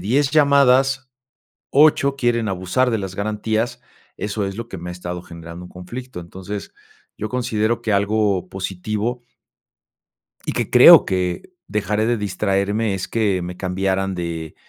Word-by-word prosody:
10 135 +6 +1
llamadas, 135 -2 +4 0.6
8 140 -1 +4
quieren 120 -4 +1
abusar 95 +8 0
de 115 - 0
las 95 -2 -5
garantías, 110 +2 -2 0.4
eso 105 -1 -2
es 95 +1 -5
lo 115 0 -6
que 95 - -7
me 90 +1 -6
ha - - -5
estado 90 0 -6
generando 85 0 -10
un - - -16
conflicto. 120 +5 -8
Entonces, 95 +4 -7 0.5
yo 110 - -3
considero 115 -2 -1
que 110 -3 0
algo 100 -2 +1
positivo 105 +5 -3 1.3
Y - - 0
que - - -2
creo - - +9
que, 90 -2 -1 0.2
dejaría 105 +1 -1
de 120 -1 +1
distraerme 100 +1 0
es 95 -1 -4
que 105 -5 +1
me 90 +1 -6
cambiaran 95 +1 -1
de, 85 -3 -5
105 Hz, 145 wpm, -21 LUFS, 90-120 Hz, 1.3 s, creo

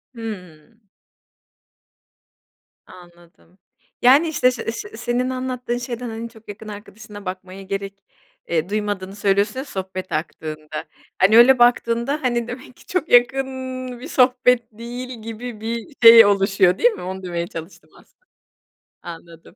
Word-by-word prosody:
Hımm. 210 -2 -9 2.0
Anladım. 175 0 -18 0.4
Yani 275 +7 +6
işt, 315 - -4
şe 250 - +5
se 235 -2 -4
se 220 -1 -8
senin 240 +2 -1
anlattığın 255 -1 -3
şeyden, 245 0 -5
hani 225 +1 -6
çok 220 -2 -18
yakın 210 +2 -9
arkadaşına 205 0 -11
bakmaya 185 +1 -7
gerek, 195 0 -6 0.4
eee, 165 +1 -1
duymadığını 205 -2 -3
söylüyorsun 205 +3 +1
ya 265 - -5
sohbet 190 -5 -6
aktığında. 155 -1 -5 0.4
Hani 215 +4 +6
öyle 250 +2 +7
baktığında, 240 +3 +2
hani, 240 -2 0
demek 250 +1 -9
ki - - -20
çok 365 -3 -2
yakın 245 +2 +4 0.5
bir 265 - -8
sohbet 250 -3 +3
değil 240 +2 -8
gibi 225 0 -7
bir 230 +6 -5
şey 230 -1 +11
oluşuyor, 195 -2 +3
değil 245 - +5
mi? - - -9
Onu 190 +1 -6
demeye 170 -1 -3
çalıştım 165 +2 -10
aslında. - - -25 0.8
Anladım. 170 0 -12
220 Hz, 135 wpm, -21 LUFS, 185-245 Hz, 2.0 s, şey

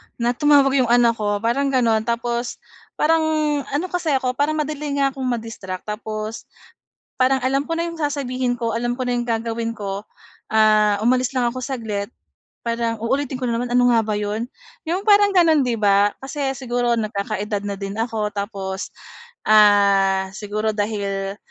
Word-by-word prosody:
na 240 0 0
tumawag 275 0 +4
'yong 250 - +2
anak 240 0 +5
ko 205 0 -1
parang 275 +5 +1
gano'n. 230 -4 +1
Tapos 235 +1 -2 0.4
parang 325 +2 +3 0.5
ano 290 +6 -1
kasi 335 -5 0
ako 255 -1 0
parang 290 +4 0
madali 295 -1 -4
niya 275 -1 +2
kong 265 -1 -4
ma-distract, 225 -6 -4
tapos 215 +1 -5 0.7
parang 260 +1 +3
alam 270 +2 0
ko 330 - -5
na 335 +1 -1
'yong 335 - -7
sasabihin 260 -5 -2
ko, 230 -1 -1
alam 240 +1 -1
ko 250 0 -3
na 245 - +1
'yong 240 - -1
gagawin 230 0 -2
ko, 200 -2 -5 0.5
ah, 215 -1 +4
umalis 250 +3 +2
lang 250 -2 +1
ako 255 +1 -5
saglit, 220 -5 -4 0.5
parang 230 -1 -1
uulitin 265 +3 -1
ko - - -3
na 230 - 0
naman, 240 +1 -3
"Ano 245 0 +4
nga 230 - +4
ba 215 - -2
'yon?" 215 +4 -3 0.4
'Yong 345 +3 -1
parang 410 -1 +6
gano'n, 325 -6 +4
'di 240 -2 0
ba? 200 0 +4
Kasi 280 +2 -4
siguro 245 -2 -1
nagkakaedad 210 -1 -3
na 205 - -3
din 195 0 -5
ako, 225 -2 -1
tapos, 195 -1 -4 0.6
ah, 200 -2 +5
siguro 215 +1 -2
dahil 200 -2 -2
235 Hz, 165 wpm, -21 LUFS, 210-265 Hz, 0.7 s, parang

